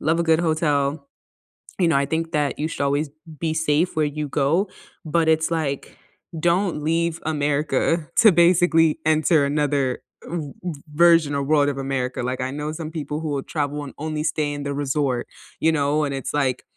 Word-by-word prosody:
love 160 +2 +1
a - - +1
good 165 0 +3
hotel, 155 - 0 0.7
you 175 - +3
know, 150 - +2
I 140 - +2
think 165 +1 -2
that 145 -3 0
you 155 - 0
should - - -5
always 145 +2 0 0.3
be 160 -1 -1
safe 160 +2 +1
where 155 - +2
you 150 - -2
go, 155 +9 +1 0.4
but 160 +1 +1
it's 160 +1 +2
like, 150 -4 -3 0.4
don't 175 -1 +1
leave 165 +1 0
America 150 +1 0
to 220 -3 +7
basically 170 -2 +4
enter 155 -1 +3
another 140 -3 0 0.3
v 155 -5 -4
v 160 -6 -5
version 165 -2 +5
of 140 -1 -2
world 145 -1 +3
of 140 - -4
America, 135 -2 -2
like, 130 +1 -2
I 130 +1 -2
know 150 +2 -4
some 160 -1 -6
people 150 -1 -4
who 155 - -3
will 140 -2 -2
travel 145 -1 -2
and 135 - -9
only 155 0 -3
stay 150 -2 -1
in 145 0 -5
the 140 0 -3
resort, 140 -3 -1 0.3
you 160 +1 +4
know, 150 0 +1
and 140 - -3
it's 135 - -5
like, 135 -4 0
150 Hz, 190 wpm, -22 LUFS, 140-160 Hz, 0.7 s, to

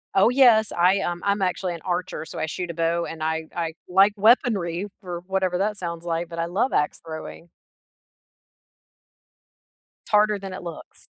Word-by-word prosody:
Oh, 195 +4 +6
yes. 240 -5 +5
I, 180 +3 +3
um 175 -2 -3
I'm 200 0 +1
actually 180 -1 -1
an 170 - -8
archer, 180 -1 -3
so - - -9
I - - -1
shoot 175 +3 -5
a - - -4
bow 165 +1 0
and 160 -1 -6
I 160 0 -2
I 165 -2 -2
like 195 +3 +5
weaponry 205 -5 +2
for 175 -3 -6
whatever 190 -2 0
that 205 +2 -1
sounds 170 -2 -5
like, 170 0 -2
but 170 - -8
I 165 - 0
love 195 +10 0
axe 150 - 0
throwing. 160 +1 -8 2.6
T - - -17
harder 210 0 +4
than 195 -1 -7
it 185 - -7
looks. 170 -2 -10
180 Hz, 175 wpm, -24 LUFS, 170-200 Hz, 2.6 s, Oh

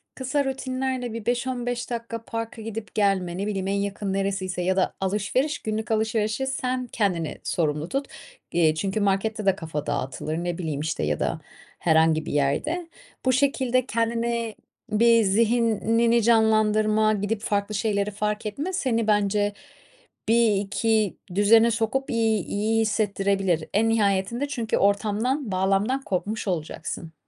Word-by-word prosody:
kısa 270 +2 -1
rutinlerle 260 -2 -2
bir 230 -2 -6
5-15 245 0 -2
dakika 230 -1 -5
parka 230 0 -5
gidip 220 -2 -7
gelme, 190 -4 +1
ne 200 - -2
bileyim, 195 -2 -2
en 200 - 0
yakın 200 0 -2
neresiyse 195 -2 -2
ya 185 +1 +1
da 185 - +1
alışveriş, 210 +10 0
günlük 215 0 -3
alışverişi 220 +3 0
sen 255 -1 -2
kendini 180 -9 -1
sorumlu 155 -1 -1
tut. 275 +1 -2 0.5
Eee, 160 -2 +3
çünkü 195 +5 -1
markette 205 +2 0
de 195 - +4
kafa 155 -2 -5
dağıtılır, 145 +2 -3
ne 175 0 -2
bileyim, 155 -5 -3
işte, 160 +1 -2
ya - - 0
da - - -1 0.4
herhangi 160 -1 +3
bir - - -3
yerde. 300 - 0 0.4
Bu 255 - +4
şekilde 255 -2 +2
kendine, 230 -1 -1 0.4
bir, 230 +1 +5
zihnini 230 +2 +2
canlandırma, 215 -1 +3
gidip 205 +1 -2
farklı 205 -1 -1
şeyleri 205 0 0
fark 210 +1 -2
etme, 290 - -3
seni 230 - 0
bence 205 0 +2 0.8
bir, 225 -2 +4
iki 210 +1 0 0.2
düzene 225 +3 +5
sokup 230 +4 -1
iyi 220 -4 +1
iyi 220 +2 0
hissettirebilir. 195 -5 0
En 225 +3 +3
nihayetinde 215 +4 +1
çünkü 235 -5 -1
ortamdan, 215 +6 +1
bağlamdan 195 +8 +1
kopmuş 210 +1 -2
olacaksın. 160 -1 -4
215 Hz, 140 wpm, -25 LUFS, 195-230 Hz, 0.8 s, bir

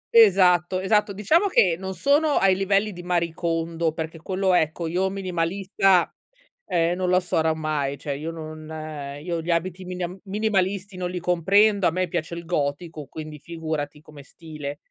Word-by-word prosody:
Esatto, 185 -4 +5
esatto. 210 +2 +2
Diciamo 230 - +2
che 185 - +4
non 190 +2 -6
sono 290 - +3
ai 190 -1 +4
livelli 195 +2 +1
di 175 - -8
Marie 175 -2 0
Kondo, 165 -1 -1
perché 160 0 -5
quello, 190 +2 0
ecco, 160 0 +1
io, 185 +4 0
minimalista, 190 0 +1 0.6
ehm, 170 0 +1
non 185 -1 -1
lo 185 0 +4
sarò 160 -3 +1
mai. 150 -3 -2
Cioè, 145 0 -4
io 155 +4 -5
non 155 -1 -8 0.6
io, 170 0 -2
gli 170 - -4
abiti 180 +2 -2
miniam 180 0 -5
minimalisti 200 -1 -1
non 180 -1 -3
li 180 - -3
comprendo. 195 +4 +3
A - - +3
me 185 0 -1
piace 170 0 -3
il 170 - -7
gotico, 155 -1 -3
quindi, 155 -1 -8
figurati, 155 -2 -5
come 150 -2 -14
stile 150 -3 -8
175 Hz, 165 wpm, -24 LUFS, 160-190 Hz, 0.6 s, Esatto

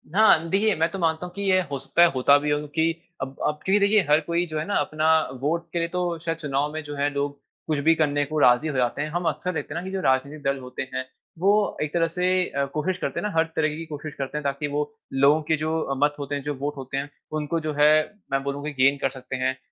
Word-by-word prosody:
हाँ। 185 -7 +5
देखिए, 205 +3 +2
मैं 165 +1 +1
तो 195 - -5
मानता 160 0 0
हूँ 180 - -9
कि 200 - -4
ये 185 -2 +3
हो 140 - -2
सकता 135 +5 +1
है 175 - +8
होता 140 +2 +5
भी 150 +1 -2
हो 145 - +2
क्योंकि 160 +2 0 0.3
अब 130 - -2 0.2
अब 150 0 -2
क्योंकि 195 +2 +4
देखिए 205 +1 +4
हर 150 - +6
कोई 170 +3 0
जो 155 -1 -4
हैं 155 - -3
ना 205 - -2
अपना 155 +2 0 0.3
वोट 165 +4 0
के 170 - 0
लिए 170 - 0
तो 175 -1 -2
शायद 165 0 -1
चुनाव 145 -1 -1
में 155 - -3
जो 145 0 -7
है 145 +1 +1
लोग 140 0 -2 0.3
कुछ 155 -2 0
भी 165 - +7
करने 145 -2 +1
को 155 +2 -2
राज़ी 125 +4 +5
हो 150 - -3
जाते 125 +3 0
हैं। 150 - -2
हम 175 +2 -3
अक्सर 170 +4 -3
देखते 155 - -4
हैं 170 - -3
ना, - - -9
कि 190 - -5
जो 190 -1 -2
राजनीतिक 140 +1 0
दल 140 0 0
होते 125 0 -7
हैं 130 0 -2 0.3
वो 205 +2 +2
एक 150 - -4
तरह 165 -1 +2
से 180 +2 -1 0.2
अ, 140 0 -1
कोशिश 165 +5 -1
करते - - -3
हैं 210 - -2
ना, 205 - -5
हर 160 - +4
तरीके 155 -1 +1
की 165 - -6
कोशिश 150 -1 -7
करते 140 +2 -4
हैं 150 - -4
ताकि 140 +1 -1
वो 145 +5 -2 0.2
लोगो 140 +3 +4
के 160 - +3
जो 155 -2 -1
मत 145 0 +3
होते 145 0 -3
हैं, 140 - -3
जो 150 - -2
वोट 145 +2 -3
होते 135 +1 -5
हैं 140 +1 -3 0.3
उनको 150 +3 -1
जो 155 -1 -3
है 150 +1 +7 0.4
मैं 135 0 0
बोलूँ 140 0 -3
की 150 - -2
गेन 140 +1 +5
कर 135 - +2
सकते 130 0 -7
हैं। 130 0 -1
150 Hz, 275 wpm, -25 LUFS, 140-170 Hz, 0.4 s, है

